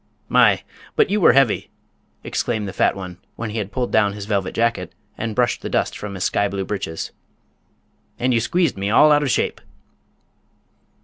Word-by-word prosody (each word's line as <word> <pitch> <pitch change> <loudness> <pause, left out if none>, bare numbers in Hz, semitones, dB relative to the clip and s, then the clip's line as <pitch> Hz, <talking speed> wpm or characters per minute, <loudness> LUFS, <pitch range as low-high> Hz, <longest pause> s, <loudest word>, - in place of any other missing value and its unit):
"My! - - +4 0.3
but 440 - +3
you 210 - +1
were 145 - +7
heavy," 135 -4 +2 0.5
exclaimed 110 -4 -2
the 95 - -6
fat - - +2
one, 90 -2 -8 0.2
when 115 -2 -5
he 110 - -3
had 100 -1 -4
pulled 125 +3 -2
down 105 -2 +3
his 105 -1 -7
velvet 100 -3 -1
jacket 100 -7 -1 0.2
and 110 -1 -4
brushed 120 +1 +1
the - - -5
dust - - 0
from 105 -1 -6
his 95 - -3
sky 100 - +1
blue 100 -1 -3
breeches. 95 -6 -4 1.1
"And 125 +1 +1
you 115 - +3
squeezed 160 - 0
me 100 +1 -1
all 150 +8 +6
out 145 0 +5
of 145 - 0
shape." - - 0
105 Hz, 185 wpm, -21 LUFS, 100-125 Hz, 1.1 s, were